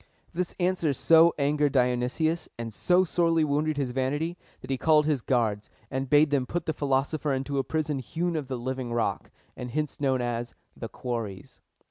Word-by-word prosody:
This 180 0 -3
answer 175 -4 +1
so 165 +5 +6
angered 145 0 +1
Dionysius, 125 +6 +1
and 115 -1 -5
so 180 - +3
sorely 165 -2 +2
wounded 150 +1 0
his 135 -3 -1
vanity, 145 +6 -1 0.3
that 130 - -7
he 135 - 0
called 155 -2 +4
his 150 -4 +1
guards, 110 -5 0 0.2
and 135 0 -2
bade 150 +1 +5
them 135 -3 +1
put 175 +3 -3
the 160 - -1
philosopher 145 +1 0
into 135 +1 -2
a - - +1
prison 150 0 -2
hewn 170 +6 -2
out - - +1
of 140 - -7
the 130 -1 -3
living 130 0 -4
rock, 120 - -1 0.3
and 125 - -6
hence 150 +3 -3
known 135 -2 +2
as 120 -1 -3 0.2
"The 115 - -6
Quarries." 115 -7 -6
140 Hz, 185 wpm, -27 LUFS, 125-155 Hz, 0.3 s, so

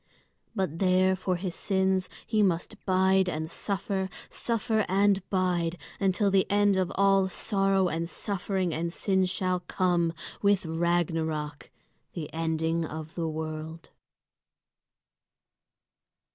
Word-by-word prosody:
But 185 -5 -2
there 185 0 +3
for 185 0 -1
his 175 0 -3
sins 190 -1 +1 0.2
he 215 -1 +1
must 180 -4 0
bide 190 0 +3
and 160 -2 -3
suffer, 195 +1 -2 0.2
suffer 225 -2 0
and 200 +1 +3
bide, 180 -3 0 0.2
until 195 +1 +2
the 190 -1 +3
end 205 -1 +3
of 185 -1 0
all 195 -1 +4
sorrow 195 -1 +1
and 165 0 -2
suffering 190 -3 -2
and 170 +2 -2
sin 190 +1 +1
shall 185 0 0
come, 175 -2 +1 0.3
with 200 -1 +3
Ragnarök, 160 -3 -1 0.5
the 160 -4 -6
ending 160 0 0
of 160 0 -6
the 165 -2 -2
world. 160 +1 -5
185 Hz, 115 wpm, -28 LUFS, 165-195 Hz, 0.5 s, all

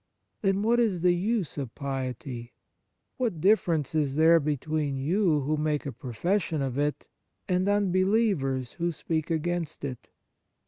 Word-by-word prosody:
Then, 195 0 +1
what 235 +2 +3
is 205 -8 +1
the 180 0 +4
use 190 -3 -1
of 130 -5 -5
piety? 130 -3 -5 0.6
What 225 -10 -1
difference 170 -6 +2
is 145 -3 0
there 165 +2 +6
between 150 -1 -1
you, 160 +2 +2
who 150 +3 0
make 150 -1 -1
a 140 - -3
profession 160 - -1
of 130 -2 -2
it, 145 0 -1 0.4
and 185 +1 +1
unbelievers, 185 - +1
who 170 0 -2
speak 160 -1 -3
against 165 -1 -2
it 130 -3 -7
160 Hz, 140 wpm, -27 LUFS, 140-185 Hz, 0.6 s, there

